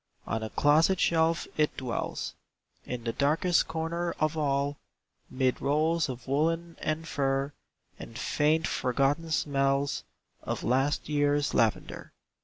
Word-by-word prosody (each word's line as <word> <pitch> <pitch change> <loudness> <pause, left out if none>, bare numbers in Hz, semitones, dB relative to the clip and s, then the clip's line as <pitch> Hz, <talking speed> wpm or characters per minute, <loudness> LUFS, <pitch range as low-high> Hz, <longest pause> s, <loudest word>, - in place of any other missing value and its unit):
On 110 - -2
a 110 - -4
closet 160 - +3
shelf 165 0 +2
it 150 -1 +1
dwells, 125 -3 -3 0.5
In 125 -2 -5
the 115 -1 -2
darkest 160 +5 +2
corner 165 +2 -2
of 155 0 +1
all, 140 -1 0 0.5
Mid 130 -1 0
rolls 155 +2 +1
of 125 -1 -7
woollen 165 +4 0
and 160 +1 -2
fur, 135 -1 0 0.5
And 115 - -9
faint, 155 +2 +1
forgotten 140 +6 0
smells 140 -2 +1 0.4
Of - - -4
last 135 +4 +1
year's 145 -1 +1
lavender. 115 -2 0
145 Hz, 125 wpm, -29 LUFS, 135-160 Hz, 0.5 s, closet